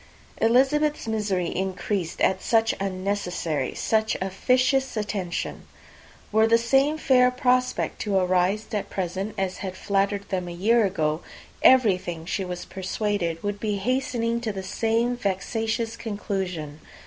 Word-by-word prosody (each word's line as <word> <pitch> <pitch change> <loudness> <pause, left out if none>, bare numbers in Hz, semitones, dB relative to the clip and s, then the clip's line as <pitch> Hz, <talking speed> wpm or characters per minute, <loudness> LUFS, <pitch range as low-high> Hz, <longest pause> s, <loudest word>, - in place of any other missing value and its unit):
Elizabeth's 270 +5 +3
misery 200 -5 -1
increased 190 -1 -2
at 190 0 +2
such 225 -1 +2
unnecessary, 185 -7 -2
such 220 0 +1
officious 255 +7 +1
attention! 200 -4 -3 0.6
Were 220 +1 +4
the 230 +1 +5
same 270 +6 +2
fair 250 -4 +4
prospect 250 0 0
to 205 -3 +1
arise 185 +3 +2
at 210 - -2
present, 190 +3 -3
as 190 -1 -1
had 185 -1 -6
flattered 200 0 0
them 185 -2 -2
a - - -5
year 220 +6 +3
ago, 160 -4 0 0.4
everything, 185 -10 +4
she 190 +2 -2
was 180 -1 -5
persuaded, 185 -3 -2
would 205 0 -2
be 210 -1 -1
hastening 235 +1 -1
to 225 -2 -2
the 190 -1 -6
same 230 +5 0
vexatious 225 +2 -2
conclusion. 190 -9 -4
205 Hz, 130 wpm, -25 LUFS, 185-230 Hz, 0.6 s, the